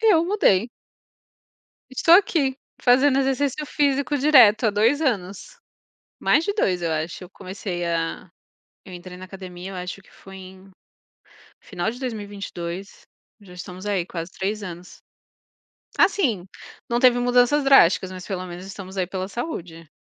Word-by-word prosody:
Eu 400 -7 +4
mudei. 240 - +2 1.2
Estou 330 +6 +5
aqui, 305 -9 +3 0.3
fazendo 265 +2 +4
exercício 275 +2 0
físico 285 0 0
direto, 250 -6 +6
há - - +3
2 225 +8 +2
anos. 235 - -3 0.6
Mais 320 - +3
de 405 - -1
2, 185 - 0
eu 165 -1 -1
acho. 160 +4 -3
Eu 180 - -12
comecei 185 -2 -6
a 165 +1 -3 0.6
eu 185 - -12
entrei 180 +1 -10
na 185 - -10
academia, 185 0 -9
eu - - -7
acho 180 +2 -6
que - - -23
foi 195 0 -14
em 190 +1 -13 0.9
final 180 +1 -3
de 245 - -9
2022. 200 -6 -6 0.4
Já 190 -3 -15
estamos 180 +2 -9
aí, 195 -4 0
quase 170 -1 -6
3 205 +2 -3
anos. 180 -1 -9 1.0
Assim, 245 - +2 0.4
não 235 0 +1
teve 245 -1 +5
mudanças 245 +4 +3
drásticas, 190 -8 +5
mas, 185 -1 -9
pelo 185 -2 -4
menos, 180 +1 -9
estamos 195 -1 -9
aí 185 -1 0
pela 190 0 -4
saúde. 180 - -6
200 Hz, 145 wpm, -23 LUFS, 180-265 Hz, 1.2 s, direto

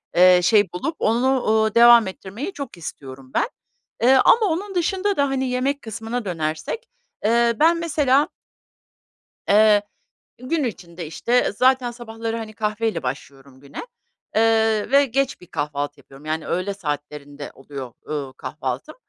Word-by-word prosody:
eee, 180 0 +7
şey 205 0 +4
bulup 315 - -3
onu, 250 +4 +2
uuu, 220 0 +2
devam 235 -2 +7
ettirmeyi 215 - -7
çok 275 -10 -7
istiyorum 135 -4 -9
ben. - - +1 0.6
Eee, 260 +2 +6
ama 450 -2 +5
onun 385 +3 -2
dışında 385 +3 0
da, 280 -1 +2
hani, 265 -1 -1
yemek 270 +3 -1
kısmına 225 +1 -5
dönersek, 165 - -4 0.4
eee, 235 +1 +3
ben 335 +2 +4
mesela 290 -3 +2 1.2
Iıı, 210 0 +5 0.6
gün 290 +4 -1
içinde, 175 -7 -6
işte, 235 +10 +1
zaten 255 +2 +2
sabahları, 230 -1 -5
hani, 220 -1 -7
kahveyle 215 -1 -2
başlıyorum 135 0 -7
güne, 140 0 -14 0.6
ııı, 225 0 +2
ve 280 0 +6
geç 270 -1 -1
bir 180 - -14
kahvaltı 145 -1 -4
yapıyorum, 135 +2 -16
yani, 155 +1 -3
öğle 185 +3 -1
saatlerinde 145 -4 -6
oluyor, 135 -3 -9
ııı, 140 -3 -4
kahvaltım. - - -5
220 Hz, 140 wpm, -22 LUFS, 155-260 Hz, 1.2 s, eee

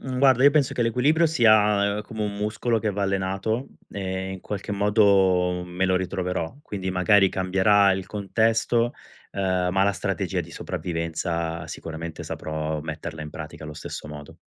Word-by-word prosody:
mhmm, 130 -1 -4
guarda 130 -1 +5
io 145 - +9
penso 145 -3 +2
che - - -3
l'equilibrio 130 +8 +3
sia, 105 -7 +4
ehm, - - -4
come 105 0 -5
un 100 -1 -4
muscolo 110 +3 0
che 110 -1 -1
va 100 0 -3
allenato 100 +5 -1 0.2
e 95 -1 -4
in 95 -1 -7
qualche 105 +1 -5
modo 95 -4 +3
me 90 +1 -2
lo 95 -1 +2
ritroverò. 90 -1 -3
Quindi 95 -2 -4
magari 95 +2 +4
cambierà 95 +2 +3
il 95 -1 -3
contesto, 115 +3 +1 0.4
ehm, 95 -2 0
ma 95 - +3
la 100 - +2
strategia - - -2
di - - -8
sopravvivenza 85 -1 -3
sicuramente 80 0 -7
saprò 80 0 -4
metterla 80 +1 -6
in 75 - -6
pratica 75 0 -8
allo 75 0 -8
stesso 75 - -7
modo. 75 -1 -10
95 Hz, 165 wpm, -24 LUFS, 90-105 Hz, 0.4 s, io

